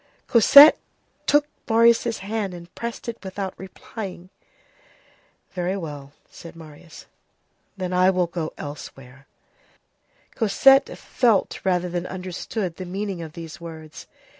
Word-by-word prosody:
Cosette 280 +6 +8 0.5
took 290 0 +4 0.2
Marius' 230 0 +3
hand, 205 -3 -3
and 170 0 -13
pressed 235 0 -6
it 235 -2 -6
without 190 0 -5
replying. 190 -1 -9 1.2
"Very 180 +1 -2
well," 145 -6 -8 0.2
said 170 -1 -13
Marius, 160 0 -14 0.7
"then 185 -1 -4
I 185 +1 +4
will 180 -1 +1
go 170 -2 -5
elsewhere." 135 -2 -10 1.1
Cosette 270 +5 +4
felt 230 -6 0
rather 180 -2 0
than 175 0 -4
understood 185 0 -5
the 185 - -6
meaning 190 0 -4
of 160 -2 -9
these 170 +2 -10
words. 160 -2 -10
185 Hz, 115 wpm, -23 LUFS, 165-210 Hz, 1.2 s, Cosette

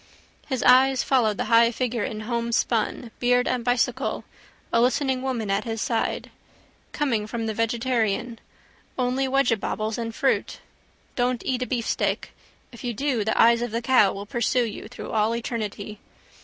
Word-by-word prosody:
His 260 -4 -2
eyes 260 +1 +5
followed 225 -6 +2
the - - -1
high 230 0 +5
figure 240 -1 -2
in 215 -4 -4
homespun, 235 0 -1
beard 245 0 +2
and 250 -2 -1
bicycle, 245 0 0 0.5
a 230 - +4
listening 260 +1 +1
woman 240 -6 -2
at 195 - +1
his 225 -1 -4
side. 225 +1 -1 0.6
Coming 235 -8 -1
from 230 +1 -3
the 220 - -2
vegetarian. 230 0 -1 0.6
Only 255 +1 0
weggebobbles 230 -4 0
and 230 -1 -4
fruit. 270 - 0 0.6
Don't 245 -1 0
eat 255 -1 -1
a 250 - -1
beefsteak. 240 -3 -1 0.4
If 235 - -12
you 240 -2 -3
do 265 -3 0
the 220 - -1
eyes 235 0 +6
of 240 - -2
that 230 +2 -3
cow 240 -5 +5
will 200 +1 -6
pursue 240 +2 +1
you 215 -1 -7
through 245 - -8
all 220 +1 +1
eternity. 215 -3 -5
235 Hz, 155 wpm, -24 LUFS, 225-250 Hz, 0.6 s, eyes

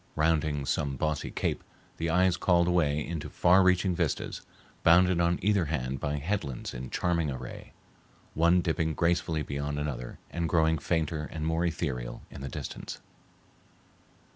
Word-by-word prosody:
Rounding 75 -2 +1
some 70 0 -1
bossy 75 +3 -1
cape, - - -2 0.3
the 85 +1 -1
eye 90 +3 +4
is 90 -2 +3
called 85 0 +3
away 75 -4 +2
into 80 -2 -5
far 90 +2 +5
reaching 90 0 +3
vistas, 85 -4 -2 0.4
bounded 90 +1 +5
on 85 0 +2
either 100 -3 +3
hand 65 -3 -2
by 75 +1 -1
headlands 75 -4 -3
in 60 0 -6
charming 85 -3 0
array, 65 -2 -7 0.6
one 85 +3 +4
dipping 80 -2 0
gracefully 85 -2 +1
beyond 70 +1 -3
another 65 -5 -4
and 85 -1 -2
growing 80 -1 +3
fainter 80 -1 -1
and 80 -1 -4
more 80 +1 +1
ethereal 70 -8 -3
in - - -9
the 70 - -5
distance. - - -6
80 Hz, 150 wpm, -29 LUFS, 75-85 Hz, 0.6 s, far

